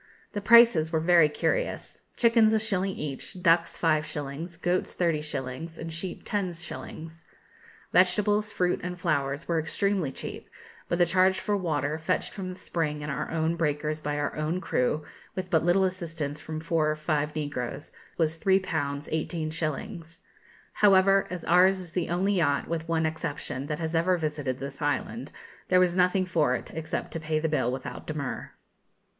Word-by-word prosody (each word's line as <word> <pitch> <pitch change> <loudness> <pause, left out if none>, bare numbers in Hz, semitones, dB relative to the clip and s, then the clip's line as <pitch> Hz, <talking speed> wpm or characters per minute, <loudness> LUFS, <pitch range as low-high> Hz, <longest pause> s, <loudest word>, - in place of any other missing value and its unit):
The 205 - -3
prices 225 -8 +6
were 160 - +2
very 165 -1 +5
curious. - - -2 0.2
Chickens 230 -2 +5
a - - +3
shilling 195 -3 -1
each, 150 +5 -6
ducks 170 -1 +3
five 155 -2 +2
shillings, 155 +2 -6
goats 180 +1 0
thirty 165 -4 +1
shillings, 150 +2 -5
and 165 0 -6
sheep 170 +2 -5
ten 195 -4 -1
shillings. 165 -1 -8 0.7
Vegetables, 205 +3 +3
fruit, 180 -2 +1
and 180 0 -5
flowers 145 -3 -1
were 170 -1 +1
extremely 180 -1 0
cheap; - - -7 0.4
but 175 - +1
the 175 - +5
charge 185 +2 +3
for 205 - 0
water, 155 -5 -1
fetched 160 - -1
from 190 -2 -5
the 180 - -9
spring 150 -3 -2
in 145 0 -4
our 140 - -3
own 165 0 0
breakers 155 -1 -1
by 145 -1 -2
our 145 -1 -2
own 155 +4 -1
crew, 150 -3 0 0.3
with 185 0 -4
but 160 -3 +3
little 175 +3 +4
assistance 165 -5 -3
from 155 0 -5
four 160 -1 +1
or 155 - 0
five 150 -1 -1
negroes, 145 -2 -4 0.2
was 160 -1 +1
3_l_. 190 +1 +3
18_s_. 160 +2 -3 0.5
However, 195 -1 +5
as 180 -2 -6
ours 185 +3 +5
is 180 -3 -8
the 175 -1 -2
only 185 +4 +1
yacht, 145 -7 +1
with 165 0 -3
one 165 -1 +1
exception, 145 -3 -3
that 150 - -2
has 160 0 -3
ever 175 +2 +3
visited 150 -5 -2
this 135 +1 -7
island, 145 - -2 0.4
there 185 - +5
was 180 -1 +3
nothing 185 +1 +3
for 155 -8 +2
it - - -6
except 160 -1 -4
to 165 - -4
pay 155 0 -1
the 160 +1 0
bill 150 -6 +1
without 130 0 -6
demur. 155 -4 -4
165 Hz, 170 wpm, -27 LUFS, 150-185 Hz, 0.7 s, prices